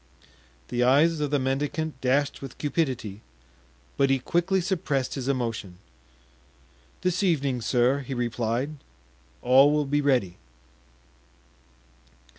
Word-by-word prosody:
The 120 - -1
eyes 150 +6 +4
of 150 -1 -1
the 145 - +2
mendicant 140 +2 -2
dashed 140 +3 0
with 135 -3 -9
cupidity, 130 - -2 0.8
but 135 - +3
he 135 - +3
quickly 175 +8 0
suppressed 170 -8 -1
his 135 -2 -4
emotion. 115 -8 -2 1.2
"This 180 +1 0
evening, 140 -9 +1
sir," 125 +3 +2
he 135 -1 -6
replied, 120 +4 -2 0.7
"all 135 +3 +6
will 150 -1 +1
be 145 +2 +1
ready." 125 -11 +1
135 Hz, 110 wpm, -26 LUFS, 125-150 Hz, 1.2 s, all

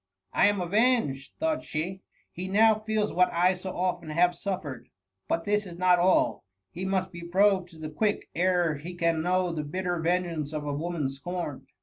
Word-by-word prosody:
'^ - - -61 0.3
I - - +5
am 205 -1 +1
avenged,^ 180 - +1
thought 320 -1 0
she; 180 +5 -4 0.3
be 180 +2 -4
now 215 +2 +4
feels 215 -1 -1
what 180 +1 +3
I 180 +2 +3
so 185 0 -6
often 180 -2 -1
have 175 +3 +3
sufiered. 175 -6 -5 0.4
But 165 - -1
this 210 0 +1
is 170 -1 -9
not 180 0 +4
all; 180 +1 +3 0.3
he 185 +2 -5
must 190 -1 0
be 175 -1 -9
probed 185 +1 +2
to 165 - -15
the 155 -1 -6
quick 205 +7 0
ere 175 -3 +2
he 175 +4 -8
ean 165 -1 +2
know 180 +1 +1
the 160 -2 -2
bitter 175 +3 -2
vengeance 165 -3 -1
of 150 -1 -3
a 145 - -2
woman 160 -1 -2
scorned. 145 +2 -5
180 Hz, 195 wpm, -28 LUFS, 165-190 Hz, 0.4 s, I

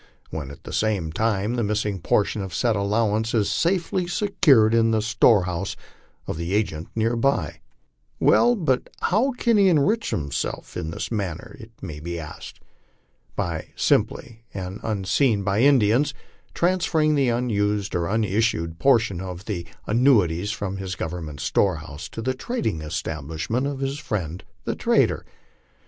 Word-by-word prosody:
when 75 -4 -5
at 70 - -12
the - - -8
same 100 -7 0
time 105 +3 0
the 120 -1 0
missing 105 -1 -1
portion 105 +4 +1
of 95 -4 -5
said 115 +2 +2
allowance 110 +2 +1
is 105 -3 +2
safely 175 +1 0
secured 155 - +4
in 115 0 +4
the 110 -1 +2
storehouse 100 -4 +2 0.5
of - - -4
the 85 +4 -2
agent 85 -6 -1
near 115 +1 +1
by. 115 - 0 0.6
Well, 240 0 +5
but 150 - 0
how 245 +8 +2
can 235 -2 +2
he 195 -2 +5
enrich 185 +8 +2
himself 70 -3 -3
in 85 -3 -3
this 80 - -5
manner? 100 - -4
it 115 -2 -11
may 80 -5 -6
be 85 +2 -5
asked. 75 -2 -9 0.8
By - - -3
simply, 115 0 0
and 95 +1 -5
unseen 105 +2 +1
by 100 +1 +1
the 130 - +6
Indians, 135 +2 +3 0.4
transferring 170 -3 +2
the 140 -4 +2
unissued 105 -5 0
portion 115 -8 +3
of 90 0 -7
the 85 -6 -4 0.2
annuities 105 -7 +3
from 100 -3 -4
his 95 -2 -4
government 80 -3 -5
storehouse 80 -4 -1
to 115 - -6
the 130 +2 0
trading 130 - -2
establishment 80 - -3
of 140 -1 -4
his 135 +1 -2
friend 90 - -4 0.2
the - - -1
trader. - - +1
105 Hz, 145 wpm, -24 LUFS, 90-130 Hz, 0.8 s, the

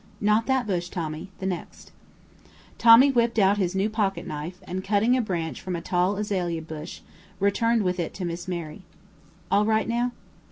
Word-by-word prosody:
"Not 210 +2 +2
that 265 -2 +1
bush, 175 -4 -2
Tommy 160 0 -5
the 190 - -6
next." 180 -3 -5 0.9
Tommy 235 +4 +8
whipped 235 -2 +1
out 200 0 +4
his 185 -1 0
new 195 +2 +2
pocketknife, 195 -6 -3
and, 185 +1 -5
cutting 210 +5 +2
a 255 - +2
branch 170 -7 -3
from 185 -1 -4
a - - -3
tall 180 +3 +1
azalea 180 -6 -2
bush, 160 +1 -8 0.4
returned 225 +3 +2
with 180 -1 -1
it 170 - -2
to 185 - -4
Miss 175 +1 -5
Mary. 170 -1 -5 0.7
"All 205 - +4
right 220 +1 +1
now?" 240 +1 0
195 Hz, 170 wpm, -25 LUFS, 175-220 Hz, 0.9 s, Tommy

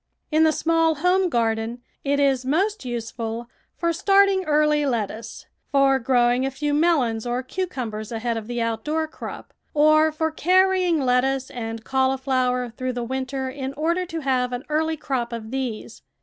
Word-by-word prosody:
In 310 +1 +4
the 315 - +4
small 325 0 +2
home 360 +4 +2
garden 230 -1 -1 0.2
it 280 0 +1
is 270 -2 +2
most 380 +10 0
useful 230 -1 -4 0.3
for 335 -1 0
starting 390 +1 +4
early 300 -1 +3
lettuce, 230 -4 -3 0.3
for 275 -1 +4
growing 245 0 +2
a 270 - +1
few 290 +2 -2
melons 275 -8 +2
or 245 +2 -1
cucumbers 250 - -4
ahead 230 +1 -2
of 220 -1 -5
the 240 0 -3
outdoor 300 +8 -1
crop, 315 - -9 0.2
or 310 +1 +5
for 320 +1 -1
carrying 365 0 +3
lettuce 260 +1 +1
and 225 -2 -5
cauliflower 260 -2 0
through 255 0 -3
the 245 -1 -3
winter 265 +2 -3
in 265 0 -5
order 335 +5 0
to 330 -2 -5
have 255 -3 0
an 245 +1 -4
early 315 +1 0
crop 255 -5 -2
of 225 -1 -6
these. 255 -5 -4
265 Hz, 160 wpm, -23 LUFS, 240-315 Hz, 0.3 s, or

